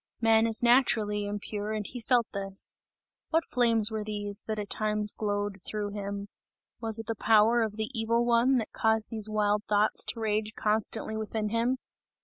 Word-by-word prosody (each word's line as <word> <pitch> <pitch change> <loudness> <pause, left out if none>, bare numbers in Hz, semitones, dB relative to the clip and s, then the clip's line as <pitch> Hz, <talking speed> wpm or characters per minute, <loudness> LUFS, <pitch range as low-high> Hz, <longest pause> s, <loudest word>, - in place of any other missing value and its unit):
Man 225 0 +4
is 225 +1 +3
naturally 220 -4 +3
impure 205 +1 -4
and 215 -1 -3
he 245 - -7
felt 240 0 +2
this! 195 -1 0 0.5
What 325 0 +1
flames 230 -3 +2
were 215 -1 -3
these, 205 -1 -3
that 220 -1 -2
at 205 -1 -5
times 210 -1 0
glowed 205 -2 -3
through 210 0 -3
him? 200 0 -5 0.5
Was 225 -2 -3
it 225 - -5
the 225 - -2
power 225 +2 +4
of 220 -2 -2
the 220 +2 -3
Evil 230 0 +1
One, 240 +3 +3
that 225 - -3
caused 220 -1 +1
these 215 -2 0
wild 210 -1 +1
thoughts 210 0 +3
to - - -3
rage 215 0 -1
constantly 220 +1 0
within 215 0 -3
him? 230 +4 0
215 Hz, 175 wpm, -28 LUFS, 210-225 Hz, 0.5 s, Man